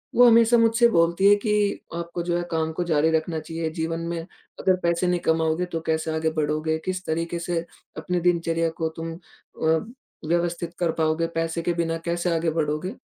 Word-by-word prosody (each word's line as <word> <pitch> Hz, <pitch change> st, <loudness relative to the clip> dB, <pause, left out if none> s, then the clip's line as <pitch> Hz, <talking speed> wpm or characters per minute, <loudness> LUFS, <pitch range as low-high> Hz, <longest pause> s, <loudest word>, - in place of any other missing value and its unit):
वो 245 Hz, 0 st, +8 dB
हमेशा 230 Hz, +1 st, +6 dB
मुझसे 230 Hz, +1 st, +4 dB
बोलती 170 Hz, +1 st, +3 dB
है 205 Hz, -, +7 dB
कि 210 Hz, -1 st, 0 dB, 0.2 s
आपको 170 Hz, 0 st, -4 dB
जो 175 Hz, 0 st, 0 dB
है 175 Hz, -, -2 dB
काम 160 Hz, -1 st, 0 dB
को 175 Hz, -, -2 dB
जारी 160 Hz, -2 st, +2 dB
रखना 160 Hz, 0 st, 0 dB
चाहिए, 165 Hz, +1 st, -4 dB
जीवन 165 Hz, +1 st, -3 dB
में 170 Hz, 0 st, -3 dB, 0.4 s
अगर 185 Hz, -, +3 dB
पैसे 170 Hz, +1 st, +1 dB
नहीं 180 Hz, 0 st, +1 dB
कमाओगे 160 Hz, +2 st, +1 dB
तो 165 Hz, -, -1 dB
कैसे 160 Hz, 0 st, 0 dB
आगे 160 Hz, 0 st, +1 dB
बढ़ोगे? 155 Hz, +1 st, 0 dB
किस 185 Hz, 0 st, -3 dB
तरीके 165 Hz, +2 st, -2 dB
से 170 Hz, -1 st, -2 dB, 0.3 s
अपनी 180 Hz, -1 st, -1 dB
दिनचर्या 165 Hz, -1 st, +1 dB
को 160 Hz, -, +1 dB
तुम 165 Hz, 0 st, -4 dB
अ, 160 Hz, -1 st, -2 dB, 0.5 s
व्यवस्थित 170 Hz, 0 st, -1 dB
कर 170 Hz, -2 st, +1 dB
पाओगे? 160 Hz, +1 st, 0 dB
पैसे 165 Hz, 0 st, -2 dB
के 170 Hz, +1 st, 0 dB
बिना 165 Hz, -1 st, -1 dB
कैसे 170 Hz, +1 st, -1 dB
आगे 165 Hz, 0 st, +1 dB
बढ़ोगे? 155 Hz, +2 st, -1 dB
165 Hz, 190 wpm, -24 LUFS, 160-175 Hz, 0.5 s, वो